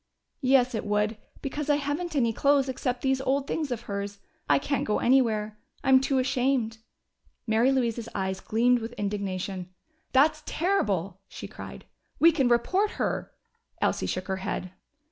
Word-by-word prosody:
"Yes, 255 -1 +4
it 220 - -2
would, 210 +1 0 0.3
because 295 +2 -3
I 290 - +5
haven't 295 +4 -2
any 235 -5 +2
clothes 280 +2 +3
except 250 -1 -2
these 265 -1 +1
old 270 +1 0
things 305 0 -2
of 240 -2 -3
hers. 200 -2 -5 0.3
I 145 - +6
can't 280 - -1
go 210 - 0
anywhere 220 -4 +2 0.2
I'm 265 -1 +6
too 270 0 +1
ashamed." 255 -3 +1 0.7
Mary 230 +3 +3
Louise's 235 -3 0
eyes 190 0 -2
gleamed 245 +3 +2
with 230 +1 -6
indignation. 195 -3 -3 0.4
"That's 300 +3 +4
terrible!" 200 - 0
she - - -8
cried. - - -10 0.3
"We 335 +2 +7
can 280 -6 +2
report 370 - +2
her - - -2 0.3
" - - -40
Elsie - - 0
shook 185 0 -3
her 190 -1 -1
head. 185 -1 -4
245 Hz, 160 wpm, -27 LUFS, 210-275 Hz, 0.7 s, We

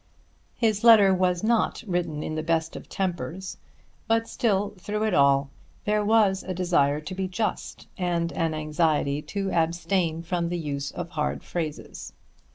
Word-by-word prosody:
His 215 -3 +1
letter 215 -5 +8
was 180 -1 +1
not 230 +2 +1
written 170 -5 -2
in 155 - -4
the 155 - -2
best 165 0 -1
of - - -9
tempers; 185 -1 -3 0.5
but 225 0 +2
still, 205 -3 0
through 210 +4 -3
it 215 -3 +1
all, 140 -1 +4 0.3
there 210 0 +1
was 205 -3 +3
a 185 - -5
desire 150 -5 +2
to 155 +5 -7
be 190 0 -2
just, 210 +4 -3
and 170 -2 0
an 165 -1 -1
anxiety 155 -2 0
to 195 +3 -3
abstain 170 0 0
from 170 0 -1
the 175 - -2
use 140 -3 -3
of 175 -1 -6
hard 150 -4 -2
phrases. 160 -4 -5
175 Hz, 160 wpm, -26 LUFS, 155-195 Hz, 0.5 s, letter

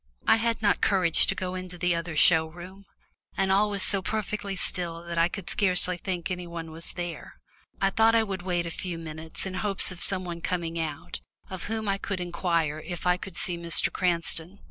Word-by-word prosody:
I - - +6
had 230 -1 0
not 205 - +3
courage 185 -5 +4
to - - +1
go 185 -1 -3
into 185 -1 -6
the 180 0 +1
other 170 -1 -3
show 160 +1 +6
room, 180 +4 -11 0.5
and 190 0 +2
all 205 +2 +4
was 200 -2 -1
so 195 0 +3
perfectly 210 -1 -3
still 170 -2 -2
that 170 -1 -3
I 165 - +5
could 185 0 -7
scarcely 185 -2 +3
think 175 0 -3
any 180 -1 -4
one 165 -1 -6
was 165 +1 -4
there. 175 -3 -6 0.4
I 195 0 +2
thought 225 +3 +4
I 225 - +5
would 195 -4 -4
wait 175 -1 -1
a 170 - -4
few 175 0 -4
minutes 160 +1 -6
in 190 - -4
hopes 195 0 +2
of 175 -1 -9
some 185 0 +4
one 170 -1 -5
coming 170 -2 -2
out, 155 -3 -4 0.3
of 185 -2 -5
whom 220 0 -3
I 195 0 0
could 195 -2 -3
inquire 170 -3 0
if 175 +3 -7
I 180 0 +4
could 185 -1 -8
see 175 -4 -1
Mr. 170 0 0
Cranston. 175 0 -1
180 Hz, 210 wpm, -27 LUFS, 170-195 Hz, 0.5 s, I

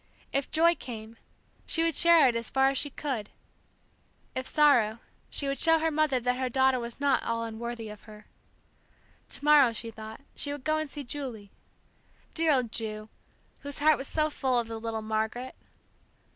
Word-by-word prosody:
If 275 0 -1
joy 335 +2 +4
came, 225 -6 -9 0.5
she 325 - +2
would 330 0 +1
share 335 -2 +6
it 240 - +1
as 230 -1 -2
far 270 0 +3
as 275 - -2
she 290 - -2
could; 260 -7 -4 1.0
if 260 0 -3
sorrow, 245 -8 +4 0.3
she 280 - -2
would 275 0 -2
show 325 -1 +5
her 320 0 0
mother 300 -4 +2
that 250 +1 0
her 260 -1 -1
daughter 265 0 +3
was 235 +1 -7
not 280 -2 +2
all 230 0 -2
unworthy 230 0 -5
of 210 -1 -10
her. 210 0 -13 1.0
To - - -7
morrow, 290 -5 +6
she 230 0 -6
thought, 220 +2 -10
she 285 - -1
would 290 -2 -6
go 310 +1 +1
and 310 -2 -4
see 290 0 -6
Julie. 240 -7 -7 0.8
Dear 325 -1 +2
old 250 -5 +1
Ju, 215 -1 -4 0.5
whose 285 0 -8
heart 305 +1 +4
was 270 - -4
so 310 -1 0
full 260 -3 0
of 235 -1 0
the 225 0 -6
little 225 -1 -4
Margaret! 220 +4 -2
260 Hz, 185 wpm, -28 LUFS, 225-290 Hz, 1.0 s, share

